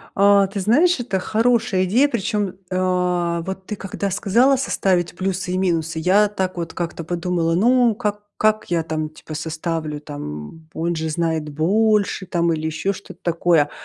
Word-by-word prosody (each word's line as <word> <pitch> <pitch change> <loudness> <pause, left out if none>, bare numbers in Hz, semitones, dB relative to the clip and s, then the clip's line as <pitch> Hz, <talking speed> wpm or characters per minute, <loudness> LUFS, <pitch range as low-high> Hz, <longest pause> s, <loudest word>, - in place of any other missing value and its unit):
А 200 0 +5
ты 195 +1 -5
знаешь, 280 - +3
это 200 -6 -1
хорошая 225 -2 +1
идея. 245 +10 +4
Причём, 210 -5 -1 0.2
э, 180 -2 0
вот 190 0 -6
ты 210 - -4
когда 195 0 -4
сказала 235 +8 +3
составить 185 -10 0
плюсы 185 -1 -2
и 185 - 0
минусы, 165 -3 0
я 195 +5 +4
так 190 -3 -3
вот 170 -1 -4
как-то 170 -1 -4
подумала: 170 0 -1
"Ну 240 +2 +4
как 210 -2 -3
как 215 -2 +1
я 165 -2 +1
там 155 -1 -3
типа 155 0 -11
составлю, 155 -1 -3
там 145 - -8
он 170 +1 -1
же 160 0 -2
знает 160 -1 -1
больше 200 +6 +1
там 170 -2 +1
или 155 0 -2
ещё 160 +5 -1
что-то 200 - -12
такое." 165 -3 +2
180 Hz, 165 wpm, -21 LUFS, 165-205 Hz, 0.2 s, А